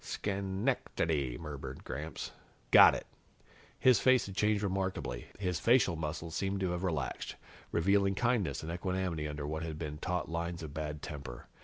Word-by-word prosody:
"Schen 100 +2 -2
ec 135 - 0
ta - - +2
dy," 70 -7 0
murmured 70 -3 -7
Gramps. 75 +3 -5 0.4
"Got - - +9
it!" - - -5 0.7
His 125 -5 +5
face 130 -1 +5
had 95 - -7
changed 105 0 +2
remarkably. 95 -10 -2
His 90 -4 -1
facial 115 -6 +4
muscles 80 +1 -4
seemed 95 +2 -1
to 95 -2 +1
have 90 +1 -2
relaxed, 80 -8 -2 0.4
revealing 100 +3 +3
kindness 120 -7 +1
and 80 - -4
equanimity 90 -3 -2
under 75 -1 -4
what 80 +2 -3
had 80 -1 -4
been 75 -2 -5
taut 90 0 -1
lines 85 0 -3
of 75 -3 -7
bad 75 -1 -4
temper. 70 -7 -7
85 Hz, 170 wpm, -33 LUFS, 75-95 Hz, 0.7 s, Got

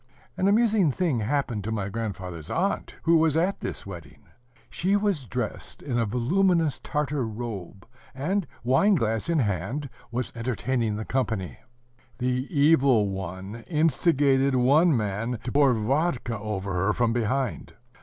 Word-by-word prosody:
An 185 - +1
amusing 210 -5 +3
thing 155 -4 0
happened 120 -2 -1
to 110 - -3
my 100 -3 -2
grandfather's 95 -7 -5
aunt, 195 +4 -1
who 165 0 +5
was 160 -1 +3
at 180 +4 +1
this - - -5
wedding. 85 -8 -10 0.4
She 190 +4 0
was 200 -9 0
dressed 120 -2 -5
in 125 -4 -1
a 115 - +1
voluminous 165 - +2
Tartar 150 -4 -2
robe, 105 -4 -7 0.3
and, 175 +7 -1 0.2
wine 135 - +4
glass 115 -1 -1
in 170 - +2
hand, 120 - -1 0.2
was 120 +1 -3
entertaining 115 -1 -1
the 110 +1 -4
company. 110 -8 -2 0.6
The 125 +1 -1
Evil 140 - +4
One 95 +4 -6
instigated 140 -4 +2
one 140 +5 +4
man 110 +3 -2
to 125 - -4
pour 140 -2 +4
vodka 120 0 0
over 100 -3 -3
her 95 +4 +1
from 120 -2 +1
behind. 125 +3 -1
125 Hz, 145 wpm, -26 LUFS, 110-150 Hz, 0.6 s, who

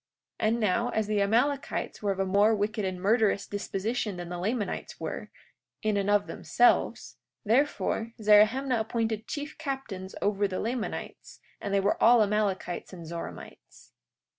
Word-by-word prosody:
43:6 - - +2
And 230 +2 +1
now, 230 +3 +1
as 220 -3 0
the 210 -1 0
Amalekites 245 +8 0
were 205 -2 +1
of 195 - -4
a 195 - +2
more 205 +3 +4
wicked 210 +1 -1
and 185 -1 -3
murderous 205 0 +2
disposition 205 +1 -3
than 175 -1 -6
the 175 0 -5
Lamanites 210 +3 -3
were, - - -5 0.5
in 215 -1 +1
and 200 0 0
of 205 0 +3
themselves, 245 - +1 0.3
therefore, 230 -1 +1
Zerahemnah 220 +5 +4
appointed 220 -1 -2
chief 295 +1 -5
captains 265 -11 -5
over 205 0 +1
the 185 -1 -4
Lamanites, 235 0 -5 0.2
and 200 - -4
they 200 - +3
were 200 +1 0
all 235 -1 +7
Amalekites 200 -4 -1
and 175 -3 -9
Zoramites. 170 +1 -9
210 Hz, 155 wpm, -28 LUFS, 200-230 Hz, 0.5 s, all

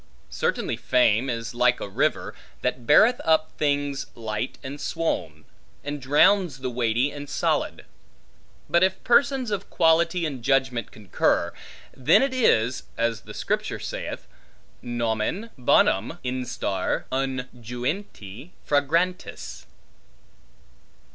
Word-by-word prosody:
Certainly 60 - -1
fame 120 +1 +2
is 115 -1 -4
like 125 +1 +3
a - - -5
river, 95 - -1 0.3
that 125 -1 -2
beareth 220 +11 +6
up 160 -1 +2
things 145 -2 0
light 110 +1 -4
and 140 +2 -7
swoln, 80 - -3 0.4
and 145 0 -5
drowns 150 +4 +4
things 130 -2 -4
weighty 120 +3 +1
and 145 -1 -8
solid. - - -1 0.8
But 170 - +3
if 190 0 +1
persons 255 0 +3
of 205 - -3
quality 170 +1 +3
and 140 -5 -4
judgment 130 -4 +1
concur, 95 -4 0 0.4
then 130 - +4
it 270 -1 0
is 130 - +2 0.2
(as 115 -3 0
the - - -11
Scripture - - -2
saith) - - -6 0.6
nomen 120 - -2
bonum 125 - +2
instar 125 -6 -2
unguenti 125 - -4 0.2
fragrantis. 150 - -1
130 Hz, 110 wpm, -25 LUFS, 115-160 Hz, 0.8 s, beareth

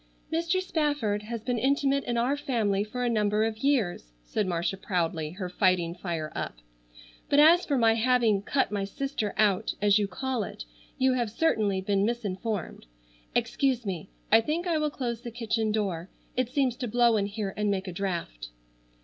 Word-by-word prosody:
"Mr. 335 +3 +1
Spafford 295 - 0
has 220 +1 -6
been 245 -1 -1
intimate 275 +2 +2
in 240 -1 -1
our 250 +4 +2
family 220 -8 0
for 250 +4 -4
a - - +1
number 210 -2 +2
of 220 -1 -3
years," 225 - 0
said 200 - -1
Marcia 175 +1 -1
proudly, 170 -5 -1
her 185 0 -4
fighting 180 -2 +1
fire 170 -4 -4
up, - - -4 0.7
"but 285 - +4
as 335 +4 +6
for 285 - +1
my 225 -2 +5
having 230 -3 +3
'cut 265 +3 0
my 205 -1 -1
sister 225 0 -3
out' 205 -3 +2
as 205 0 +4
you 205 - 0
call 255 +5 -2
it, - - -7 0.3
you 260 0 +3
have 240 -3 0
certainly 210 -7 +1
been 195 0 +1
misinformed. 210 - -3 0.5
Excuse 260 -4 +1
me, 190 -2 -4 0.2
I 225 +1 +7
think 315 +9 -2
I 335 -3 +1
will 305 0 +1
close 240 -5 -4
the 240 - -6
kitchen 225 -1 -1
door. 190 -5 -2 0.3
It 255 -1 0
seems 265 -2 +1
to 245 - -3
blow 235 0 +4
in 200 -2 +1
here 200 -2 -4
and 210 -1 0
make 190 -1 -1
a 185 - -5
draft." 170 - -4
220 Hz, 185 wpm, -28 LUFS, 195-255 Hz, 0.7 s, I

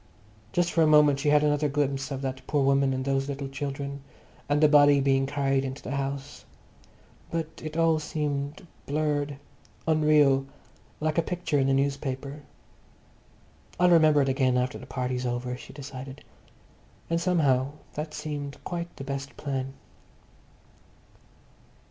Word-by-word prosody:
Just 175 +3 +1
for 165 - +2
a 160 - +5
moment 150 -2 +5
she 145 +1 +1
had 150 0 +5
another 150 0 +2
glimpse 140 -1 -1
of 135 -1 -4
that 130 -1 -3
poor 145 -2 +1
woman 135 0 +3
and 130 0 -2
those 135 0 0
little 140 0 -4
children, 140 0 -5 0.5
and 145 0 +3
the 155 - +6
body 145 -1 +6
being 135 0 +2
carried 135 -1 +1
into 135 +1 -5
the - - -6
house. 140 +1 -4 0.9
But 160 -1 -4
it 155 +1 -5
all 165 -1 +3
seemed 150 +1 -3 0.2
blurred, 145 -1 -1 0.5
unreal, 150 -4 +4 0.5
like 155 +1 0
a - - +5
picture 170 -3 -1
in 135 - +2
the 135 - +3
newspaper. 140 +1 -2 1.4
I'll 180 0 +5
remember 155 -4 +6
it 135 - 0
again 130 -2 +2
after 125 0 -1
the 130 - -11
party's 125 -1 -2
over, 125 +1 -2
she 125 - -11
decided. 135 -1 -9 0.8
And 165 0 0
somehow 145 -7 +2 0.2
that 150 +1 -5
seemed 145 -2 -5
quite 170 -1 -5
the 135 - -7
best 135 0 -5
plan.... 135 -2 -3
140 Hz, 150 wpm, -27 LUFS, 135-150 Hz, 1.4 s, the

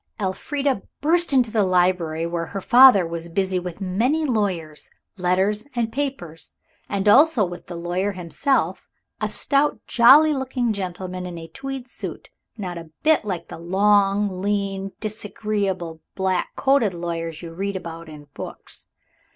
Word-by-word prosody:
Elfrida 260 +6 -1 0.2
burst 335 +3 +3
into 250 -5 +3
the 220 - +2
library 180 -3 +1
where 170 -1 -3
her 200 - -5
father 245 -2 +7
was 170 0 -5
busy 190 +1 0
with 180 0 -7
many 230 +12 0
lawyers' 185 - -2 0.3
letters 190 +3 +1
and 230 -2 -1
papers, 180 - -5 0.3
and 200 0 -1
also 265 0 +6
with 175 0 -9
the 175 - -7
lawyer 175 +4 -2
himself, 185 - -1 0.3
a - - 0
stout, 285 +1 +1
jolly 285 +6 +6
looking 255 -4 -1
gentleman 185 -1 -5
in 175 -1 -7
a 165 0 -8
tweed 270 +7 -7
suit, - - -8 0.3
not 180 -5 -5
a 165 -1 -11
bit 310 -4 +4
like 180 -5 -4
the - - -8
long, 195 +1 +2
lean, 195 -1 -1
disagreeable, 205 -5 -3
black 190 -1 -1
coated 265 -9 +2
lawyers 165 -1 -4
you 165 -1 -8
read 195 +3 -3
about 165 -2 -7
in 150 -1 -11
books. - - -9
195 Hz, 145 wpm, -22 LUFS, 175-235 Hz, 0.3 s, father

